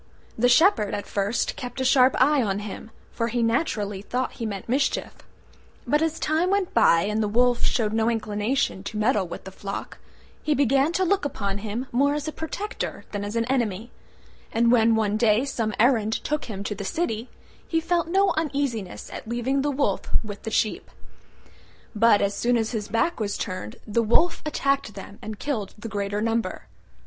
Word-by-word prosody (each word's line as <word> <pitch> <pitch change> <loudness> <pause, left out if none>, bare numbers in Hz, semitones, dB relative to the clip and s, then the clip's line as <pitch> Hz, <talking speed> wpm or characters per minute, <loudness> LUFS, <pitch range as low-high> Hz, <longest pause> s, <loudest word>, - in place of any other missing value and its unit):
The 245 +2 +3
Shepherd 245 - +4
at 205 - -4
first 205 +3 -1
kept 250 +1 -6
a 260 - 0
sharp 260 0 +5
eye 285 +2 +4
on 200 -4 0
him, 210 +1 -7 0.2
for 230 - -1
he 235 0 0
naturally 210 -5 0
thought 250 +5 -2
he 230 -3 -5
meant 200 -2 -5
mischief: 270 +4 0 0.7
but 295 +1 +2
as 325 0 0
time 320 +4 +1
went 395 -2 0
by 170 -7 +5
and 210 +2 0
the 210 - +1
Wolf 245 +3 +2
showed 215 -3 +1
no 225 +1 +2
inclination 215 0 -1
to 215 - -5
meddle 210 -3 +2
with 170 - -8
the 190 - -9
flock, 195 +1 -6 0.4
he 300 - +1
began 275 +2 +3
to 375 - +1
look 395 +2 +2
upon 200 -8 -2
him 220 +4 -4
more 280 +4 +2
as 300 +1 -3
a - - -1
protector 350 +7 -5
than 205 -1 -3
as 205 +2 -5
an 230 0 +1
enemy: 235 -4 -1 0.6
and 235 +1 +3
when 230 -2 +5
one 215 -1 +1
day 220 +2 +3
some 230 -5 -1
errand 225 -2 +3
took 300 +1 -1
him 200 -4 -6
to 210 - -3
the 200 0 -6
city, 230 - -2 0.4
he 325 - +1
felt 340 0 0
no 390 +3 +3
uneasiness 275 - -2
at - - -7
leaving 240 +4 0
the 290 - 0
Wolf 270 -8 -1
with 205 -2 -7
the 225 - -4
sheep. 220 0 0 1.1
But 215 -1 +5
as 200 0 +1
soon 240 +3 +2
as 225 -1 -1
his 215 -3 -3
back 230 +10 0
was 205 -2 -2
turned 185 - -5
the 225 +2 +1
Wolf 240 +10 +3
attacked 275 -7 0
them 200 +1 -10
and 215 -1 -6
killed 220 -6 -3
the 225 +2 -7
greater 205 0 -2
number. 230 0 -1
230 Hz, 190 wpm, -25 LUFS, 210-275 Hz, 1.1 s, sharp